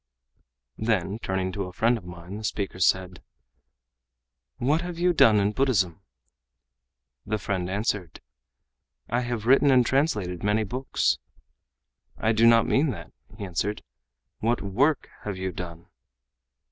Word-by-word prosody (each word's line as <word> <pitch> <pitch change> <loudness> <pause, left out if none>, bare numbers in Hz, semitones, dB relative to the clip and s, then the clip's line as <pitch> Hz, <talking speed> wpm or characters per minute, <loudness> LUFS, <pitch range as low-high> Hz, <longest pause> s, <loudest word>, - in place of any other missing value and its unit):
Then 105 -2 0
turning 95 -3 -2
to 100 0 -3
a 90 - -8
friend 115 +6 +2
of 105 -6 -8
mine 90 +2 -8
the 110 - -8
speaker 100 -3 -3
said: 90 0 +1 1.4
"What 145 - +1
have 175 -1 -6
you 175 +1 +2
done 110 -9 +6
in 100 +1 +2
Buddhism?" 100 -8 +1 1.2
The 110 +6 -2
friend 95 -3 -2
answered: 100 -4 -2 0.9
"I 120 - +1
have 120 -3 -3
written 135 +3 +5
and 125 -2 +5
translated 105 - 0
many 105 +2 +2
books." 125 +6 0 1.0
"I 110 - +1
do 115 +1 +4
not 115 -1 +6
mean 145 +3 +2
that," 120 - -6 0.3
he 100 - -5
answered. 95 +3 -2 0.6
"What 115 +1 0
work 130 +10 +1
have 105 -3 -5
you 95 0 -3
done?" 85 -1 -8
105 Hz, 135 wpm, -26 LUFS, 95-120 Hz, 1.4 s, done